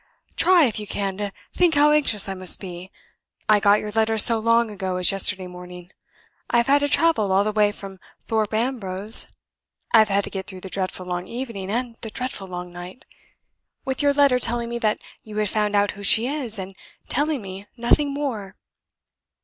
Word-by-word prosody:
"Try, 360 -4 +5
if 225 -4 -1
you 210 - -7
can, 195 -1 -3
to 205 -1 -4 0.2
think 350 -3 +2
how 295 +1 +5
anxious 275 -10 +2
I 195 - -3
must 185 -1 +1
be. 180 -1 -8 0.6
I 215 -1 +5
got 205 +1 +4
your 210 - -6
letter 220 +1 +1
so 225 +1 +4
long 230 0 +2
ago 190 -2 -4
as 180 -1 +4
yesterday 195 -1 +1
morning. 180 0 -11 0.6
I - - +2
have 235 - +3
had 280 +1 +4
to 285 0 -1
travel 305 -12 +3
all 195 +1 +3
the 215 - -1
way 210 -1 +2
from 195 -2 -10 0.3
Thorpe 220 -2 -1
Ambrose 220 -3 +3 0.7
I 230 - +8
have 215 -1 +4
had 200 0 +1
to - - -6
get 190 -1 -5
through 185 -2 -9
the 190 - -8
dreadful 185 0 -3
long 180 0 -4
evening 230 -6 -6
and 235 0 -3
the 225 - -6
dreadful 250 -4 -5
long 180 -1 -7
night 175 +5 -10 0.8
with 265 +1 -1
your 285 -1 +3
letter 280 -3 +4
telling 235 0 -2
me 235 0 -4
that 215 -2 +1 0.2
you 215 -1 -10
had 210 -1 0
found 210 0 0
out 205 0 +2
who 205 - -12
she 220 +3 +4
is, 260 -5 -4
and 190 0 -7 0.3
telling 295 -1 0
me 195 +1 -9
nothing 280 +5 +2
more. 235 -9 -4
210 Hz, 200 wpm, -23 LUFS, 195-240 Hz, 0.8 s, I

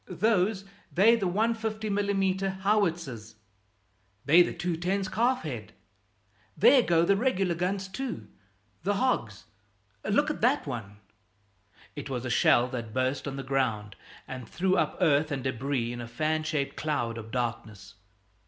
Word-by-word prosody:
"Those, 195 +1 +1 0.3
they're 215 +6 +5
the 200 -5 -1
150 220 +2 -1
mm. 195 -2 0
howitzers." 170 - 0 0.9
"They're 165 +5 +7
the - - -3
210's, 180 +3 -1
calf 245 +5 +1
head." - - -6 0.8
"There 270 - +7
go 170 -6 +3
the 200 - +4
regular 195 -6 +1
guns, 190 +3 -2
too; 190 - -5 0.5
the 200 +4 0
hogs! 195 - -1 0.6
Look 285 +9 +2
at - - -7
that 255 +6 +2
one!" 115 -7 -6 1.0
It 145 -1 -6
was 125 -2 -3
a 120 - -2
shell 120 +1 +4
that 115 -4 -6
burst 130 +2 -1
on 135 - -4
the 135 - -5
ground 115 -6 -1 0.3
and 125 -3 -7
threw 185 +2 +1
up - - 0
earth 150 -3 +3
and 135 -3 -3
debris 130 -1 -2
in 120 - -6
a 120 - -7
fan 155 +6 -1
shaped 155 -3 -2
cloud 120 -7 -2
of 110 0 -9
darkness. 110 -5 -4
165 Hz, 145 wpm, -28 LUFS, 125-200 Hz, 1.0 s, They're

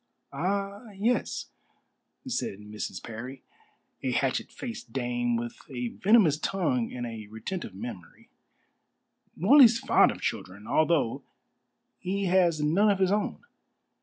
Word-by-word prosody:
"Ah 200 +4 -2
yes," 230 +5 -1 0.8
said 235 - -2
Mrs. 105 -2 -6
Parry, 125 +4 -8 0.6
a - - -1
hatchet - - 0
faced 230 - -7
dame 120 -1 -1
with 120 0 -3
a 125 -3 -3
venomous 190 - +4
tongue 155 -11 0
and 120 -1 -4
a 110 -3 -7
retentive 110 - -6
memory, 95 -5 -9 1.0
"Morley's 240 - +7
fond - - +4
of - - -5
children, 100 +3 -4
although 155 -3 +2 0.8
he 195 +2 -2
has 175 -4 +3
none 185 +8 +3
of 200 - +3
his 190 -1 +2
own." 210 +1 -1
155 Hz, 120 wpm, -28 LUFS, 115-195 Hz, 1.0 s, Morley's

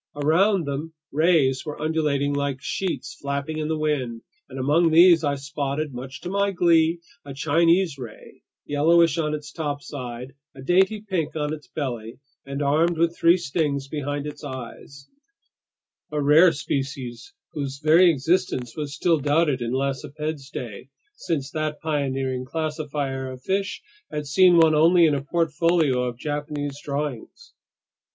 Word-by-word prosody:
Around 165 +6 +2
them, 145 +3 -5 0.2
rays 150 -4 +2
were 150 - -7
undulating 150 -2 0
like 140 -2 -2
sheets 155 -2 -3
flapping 140 +2 -3
in 155 - -2
the 160 0 -1
wind, 135 -7 -2 0.3
and 135 - -9
among 150 +6 +3
these 170 0 +6
I 145 -1 +1
spotted, 140 +1 -3
much 130 +3 -8
to 180 - -5
my 200 0 +1
glee, 170 -2 +3 0.2
a 140 -1 -9
Chinese 165 +2 +2
ray, 115 -4 -11 0.2
yellowish 165 +3 +3
on 150 -1 0
its 150 -1 -8
topside, 140 -5 -5 0.2
a 130 - -10
dainty 190 +7 +2
pink 165 -6 -2
on 150 -1 -2
its 150 -1 -9
belly, 120 -5 -5 0.3
and 140 +1 -3
armed 160 +4 +2
with 170 +1 +1
three 170 +2 +4
stings 140 -4 -2
behind 145 0 -3
its 150 0 -8
eyes; 130 +2 -9 1.0
a 150 - -1
rare 150 +5 +6
species 135 - -4 0.2
whose 140 -2 -4
very 160 +5 +5
existence 140 -5 0
was 145 -2 -5
still 165 -3 +2
doubted 145 -1 +1
in 120 0 -2
Lacépède's 140 +2 -3
day, 120 -1 -7 0.3
since 145 - -3
that 155 -1 -3
pioneering 135 -4 -2
classifier 145 -3 -3
of 130 0 -10
fish 195 +1 -2 0.3
had 150 -1 -4
seen 175 +4 +5
one 160 -1 +6
only 165 +3 +5
in 155 - +3
a 140 - -1
portfolio 165 -2 +1
of 120 -1 -4
Japanese 145 0 -4
drawings. 145 - -5
150 Hz, 145 wpm, -24 LUFS, 140-165 Hz, 1.0 s, these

